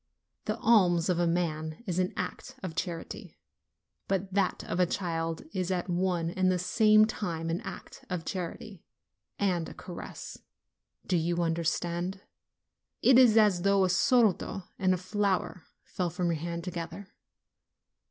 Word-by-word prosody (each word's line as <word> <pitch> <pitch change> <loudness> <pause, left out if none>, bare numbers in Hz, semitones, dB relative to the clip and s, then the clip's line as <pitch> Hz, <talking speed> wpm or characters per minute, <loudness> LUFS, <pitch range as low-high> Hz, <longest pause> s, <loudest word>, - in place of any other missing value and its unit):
The 215 +1 -1
alms 185 -7 +4
of 175 -1 +2
a 175 - +2
man 160 0 -2
is 180 -3 -1
an 185 0 +1
act 180 - -5
of 185 -3 -4
charity; 170 0 -5 0.7
but 195 0 -1
that 195 -2 +1
of - - -3
a 180 - +4
child 165 -3 -2
is 185 -2 -1
at 180 -1 -1
one 175 -2 0
and 185 +1 +2
the 185 - +1
same 215 +4 +5
time 165 -7 -3
an 170 - -2
act - - -9
of 175 -3 -3
charity 185 +1 -5 0.5
and 180 -5 0
a - - -11
caress 175 -2 -8 0.7
do 185 - 0
you 170 +1 0
understand? 170 +3 -1 0.8
It 260 -1 +7
is 235 -4 +6
as 205 -5 +5
though 200 +1 +3
a 185 - +2
soldo 195 0 +2 0.2
and 185 -1 +3
a - - -3
flower 185 -1 -1 0.2
fell 180 -2 -2
from 175 +1 -1
your 160 -3 -2
hand 170 0 -4
to 180 - -4
gether. 170 +3 -6
180 Hz, 155 wpm, -29 LUFS, 170-195 Hz, 0.8 s, It